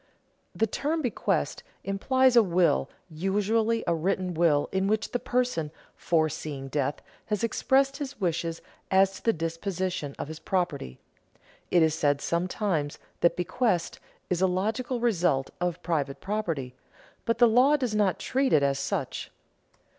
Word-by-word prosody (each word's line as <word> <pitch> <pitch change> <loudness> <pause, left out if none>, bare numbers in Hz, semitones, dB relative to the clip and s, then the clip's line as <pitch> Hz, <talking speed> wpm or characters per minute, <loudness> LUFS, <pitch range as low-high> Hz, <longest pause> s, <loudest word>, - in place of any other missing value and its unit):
_ - - -37 0.6
The 225 - +5
term 300 +8 -2
bequest 245 - -1 0.2
implies 260 +6 +2
a 235 - +9
will, 175 - +2 0.2
usually 210 +7 0
a 170 - +2
written 180 +2 -1
will 160 -3 +3
in 190 0 0
which 215 +1 0
the 245 - 0
person, 245 -11 0 0.3
foreseeing 155 -4 -1
death, 145 0 -2 0.2
has 210 +1 -1
expressed 270 +4 +2
his 280 -3 -6
wishes 165 -3 -2 0.3
as 195 0 +4
to - - -13
the 230 - +4
disposition 165 -2 -3
of - - -4
his 160 0 -8
property. 160 - -2 0.7
It 175 -2 +4
is 160 -1 +3
said 145 -2 +1
sometimes 170 -2 -1 0.2
that 170 - +3
bequest 180 0 0 0.3
is 180 -1 -1
a 190 - +5
"logical" 220 +7 -1
result 175 - +1
of 175 0 -2
private 145 -5 -1
property, 165 -11 -3 0.5
but 230 0 +1
the 240 0 +6
law 255 +6 +5
does 250 -6 -2
not 205 -3 +2
treat 265 +1 0
it 150 -2 +5
as 140 -1 +1
such. 140 - -3
185 Hz, 150 wpm, -27 LUFS, 160-225 Hz, 0.7 s, a